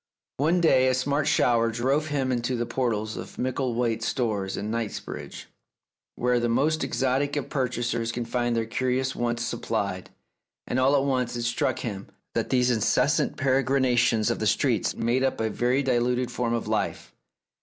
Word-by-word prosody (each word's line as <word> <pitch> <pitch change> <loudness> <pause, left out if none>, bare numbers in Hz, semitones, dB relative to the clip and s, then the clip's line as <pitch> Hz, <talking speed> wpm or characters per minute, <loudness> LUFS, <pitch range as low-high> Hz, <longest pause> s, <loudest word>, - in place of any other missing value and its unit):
One 165 +6 +2
day 130 -6 +4
a 130 - +3
smart 140 +3 0
shower 115 -5 +3
drove 135 +6 0
him 135 -3 -1
into 125 +1 -1
the 120 0 -1
portals 110 -4 -2
of - - -8
Micklethwait's 120 -3 -1
Stores 105 -6 -1
in 105 +1 -3
Knightsbridge, 115 -2 -5 0.7
where 125 0 +1
the 120 0 0
most 150 +7 +1
exotic 135 +2 0
of 145 - -3
purchasers 120 -3 -1
can 120 0 -3
find 120 0 -1
their 115 -1 0
curious 130 +3 -1
wants 120 0 -1
supplied, - - -3 0.6
and 125 - -1
all 135 +2 +4
at 135 - +3
once 130 -3 0
it 120 - -3
struck 120 +2 0
him 100 -4 -5 0.3
that - - -1
these 125 -1 +3
incessant 110 -4 +1
peregrinations 130 -4 +2
of - - -2
the - - 0
streets - - +1
made 120 +3 +1
up 135 - 0
a 110 -1 0
very 125 +5 +1
diluted 125 -1 +1
form 120 -1 -1
of 115 - -3
life. - - -2
125 Hz, 165 wpm, -26 LUFS, 115-130 Hz, 0.7 s, day